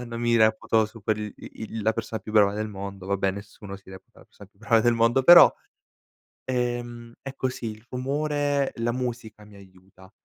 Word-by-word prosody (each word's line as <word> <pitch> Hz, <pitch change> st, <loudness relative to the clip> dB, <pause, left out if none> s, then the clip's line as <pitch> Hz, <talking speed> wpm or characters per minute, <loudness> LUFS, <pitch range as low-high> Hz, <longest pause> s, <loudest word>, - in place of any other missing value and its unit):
uhm, -, -, -6 dB
non 115 Hz, 0 st, -6 dB
mi 120 Hz, 0 st, +2 dB
reputo 110 Hz, 0 st, +2 dB
su 110 Hz, 0 st, -15 dB
quel 105 Hz, 0 st, -2 dB
i -, -, -11 dB
il 110 Hz, 0 st, -6 dB
la 110 Hz, +2 st, +2 dB
persona 110 Hz, 0 st, -5 dB
più 105 Hz, -, -9 dB
brava 105 Hz, -2 st, +4 dB
del 110 Hz, +1 st, -3 dB
mondo, 100 Hz, -1 st, -8 dB
vabbè, 100 Hz, 0 st, 0 dB
nessuno 100 Hz, 0 st, -9 dB
si 95 Hz, -, -20 dB
reputa 95 Hz, 0 st, -15 dB
la -, -, -18 dB
persona 100 Hz, -, -17 dB
più 100 Hz, -, -35 dB
brava 115 Hz, +1 st, +2 dB
del 120 Hz, +1 st, +2 dB
mondo, 115 Hz, +3 st, +2 dB
però, 175 Hz, +5 st, +9 dB, 0.9 s
ehm, 120 Hz, -2 st, -3 dB
è 135 Hz, -, -8 dB
così, 130 Hz, -3 st, -4 dB
il 110 Hz, +2 st, -14 dB
rumore 145 Hz, +2 st, -1 dB
la 115 Hz, 0 st, -1 dB
musica 120 Hz, -3 st, -5 dB
mi 105 Hz, -1 st, -17 dB
aiuta, 95 Hz, -1 st, -18 dB
110 Hz, 200 wpm, -25 LUFS, 100-120 Hz, 0.9 s, però